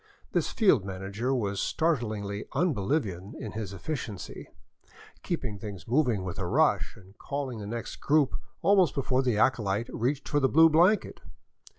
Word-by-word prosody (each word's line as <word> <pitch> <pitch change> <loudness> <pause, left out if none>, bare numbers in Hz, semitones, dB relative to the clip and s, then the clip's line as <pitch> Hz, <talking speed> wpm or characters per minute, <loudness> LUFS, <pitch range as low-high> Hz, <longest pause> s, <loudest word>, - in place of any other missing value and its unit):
This - - 0
field 185 - +4
manager 100 +6 -3
was 100 -7 -1
startlingly 110 -10 -1
un 165 +4 +2
Bolivian 100 - -2
in 110 - -6
efficiency, 105 - -5 0.7
keeping 125 - -3
things 100 -1 -8
moving 120 -6 +2
with 95 +1 -5
a 95 - -2
rush, - - +2
and 95 +1 -17
calling 140 -5 -4
the 100 - -6
next 115 +2 -5
group 145 -2 +2 0.3
almost 185 -4 +4
before 130 -1 +1
the 125 -5 +1
acolyte 110 -2 +1
reached 130 +5 -1
for 145 - +1
the 135 -2 +2
blue 160 +3 +6
blanket. 180 +7 +3
120 Hz, 150 wpm, -28 LUFS, 100-145 Hz, 0.7 s, blue